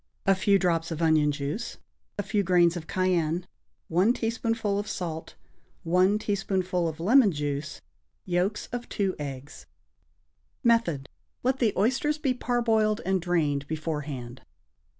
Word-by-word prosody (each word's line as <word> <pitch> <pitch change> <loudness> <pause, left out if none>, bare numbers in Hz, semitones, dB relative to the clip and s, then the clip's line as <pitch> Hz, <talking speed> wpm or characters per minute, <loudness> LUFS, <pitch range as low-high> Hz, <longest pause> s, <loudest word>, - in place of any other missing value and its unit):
A 195 - +5
few 195 +1 +3
drops 170 -3 0
of 165 -2 -4
onion 155 -3 +3
juice. 145 +10 -4 0.4
A 205 - -1
few 205 +1 0
grains 175 -2 +4
of 165 -2 -6
cayenne. 180 -3 0 0.4
1 185 +8 +3
teaspoonful 225 -3 -1
of 205 - -4
salt. 165 -3 -5 0.5
1 185 +4 +3
teaspoonful 190 -4 -1
of 160 0 -5
lemon 220 +4 +5
juice. 145 -1 -4 0.4
Yolks 185 +4 0
of 245 0 -5
2 195 -2 -1
eggs. 140 -1 -7 1.0
Method. 200 - +2 0.4
Let 260 +1 +1
the 230 -4 +3
oysters 265 +8 +1
be 275 -4 0
parboiled 225 -4 +1
and 190 0 +1
drained 150 -5 0
beforehand. 150 -6 -4
185 Hz, 130 wpm, -27 LUFS, 160-215 Hz, 1.0 s, A